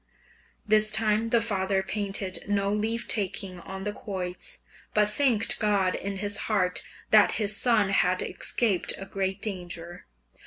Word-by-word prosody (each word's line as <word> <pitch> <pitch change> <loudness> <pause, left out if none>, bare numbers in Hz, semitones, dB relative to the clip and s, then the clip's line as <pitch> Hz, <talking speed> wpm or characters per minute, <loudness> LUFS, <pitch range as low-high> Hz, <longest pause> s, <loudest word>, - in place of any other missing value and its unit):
This 215 0 +5
time 220 +1 +1
the 235 0 +3
father 195 -3 0
painted 195 -1 -3
no 200 -1 +1
leave 225 +3 -1
taking 190 -3 -1
on 190 +2 -8
the 210 0 -2
quoits, 185 -4 -5 0.4
but 210 -1 +4
thanked 225 -2 +2
God 200 -4 +2
in 200 0 -4
his 205 +1 -2
heart 185 -4 +1 0.3
that 215 -1 +6
his 210 -2 0
son 220 -3 +2
had 185 -2 +2
escaped 210 -7 +1
a 195 - -7
great 195 0 -3
danger. 175 -4 -6
200 Hz, 145 wpm, -27 LUFS, 190-215 Hz, 0.4 s, that